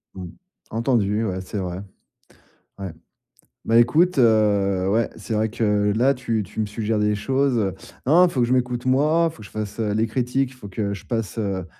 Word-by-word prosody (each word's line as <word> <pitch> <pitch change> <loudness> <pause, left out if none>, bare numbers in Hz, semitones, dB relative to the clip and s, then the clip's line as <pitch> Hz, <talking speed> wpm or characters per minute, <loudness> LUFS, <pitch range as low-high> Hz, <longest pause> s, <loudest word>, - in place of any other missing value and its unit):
Mmh. 95 - -6 0.5
Entendu, 115 -2 +1
ouais, 95 -2 -3
c'est 100 +2 -6
vrai. 90 0 -4 1.0
Ouais. 95 -3 -5 0.7
Bah, 115 +1 +3
écoute, 160 +8 +3
heu, 100 -5 +3
ouais, 115 +2 +1
c'est 115 - -6
vrai 110 +1 +1
que 105 -2 +1
là, 130 +4 +3
tu 115 -4 -2
tu 105 +3 -9
me 110 - +1
suggères 105 +1 -2
des 105 0 +2
choses, 135 +3 0
heu, 95 -4 0 0.3
non, 150 +5 +3
non, - - +8
il - - -4
faut 125 - 0
que 120 - +2
je 125 - +1
m'écoute 125 -1 -1
moi, 155 +6 +3
il - - -17
faut - - -19
que 105 - -10
je - - -18
fasse, 105 0 -5
heu, 105 -2 0
les 110 +2 +1
critiques, 125 +3 -1
il - - -14
faut 115 -5 -11
que 100 +1 -3
je 100 - -9
passe, 115 -3 -3
heu, 95 -4 -2
110 Hz, 220 wpm, -22 LUFS, 105-125 Hz, 1.0 s, non